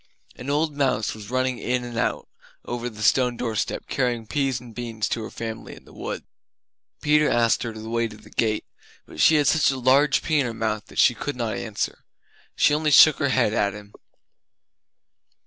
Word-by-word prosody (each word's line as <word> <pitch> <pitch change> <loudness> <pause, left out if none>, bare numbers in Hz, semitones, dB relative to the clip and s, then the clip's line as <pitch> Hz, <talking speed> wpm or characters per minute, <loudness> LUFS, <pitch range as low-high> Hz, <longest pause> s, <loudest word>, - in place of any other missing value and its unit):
An 125 - -8
old 150 +1 0
mouse 130 -6 0
was 105 -1 -10
running 130 0 -1
in 125 0 -1
and 120 -1 -7
out - - -1 0.4
over 120 0 -4
the 105 -2 -8
stone 125 +2 +3
doorstep, 115 -3 -2
carrying 120 -3 -1
peas 135 0 -1
and 120 -2 -13
beans 115 -2 -3
to 115 - -2
her 110 - -6
family 115 -1 -7
in - - -17
the - - -17
wood. - - -6 0.8
Peter 150 0 +4
asked 115 -1 +2
her 115 - -3
the 110 0 -9
way 115 0 0
to 105 -1 -12
the - - -17
gate 110 -2 0 0.4
but - - -13
she 160 - +6
had 150 -1 +3
such 160 0 +4
a 135 - -1
large 135 +3 +3
pea 155 -2 +1
in 130 - +1
her 115 - -5
mouth 110 -2 -3
she - - +5
could - - -5
not - - -2
answer. - - -4 0.5
She - - +3
only 155 +1 +1
shook 150 +1 +7
her 140 -3 0
head 125 -5 +2
at 100 -3 0
him. 105 0 -12
120 Hz, 200 wpm, -24 LUFS, 110-140 Hz, 0.8 s, shook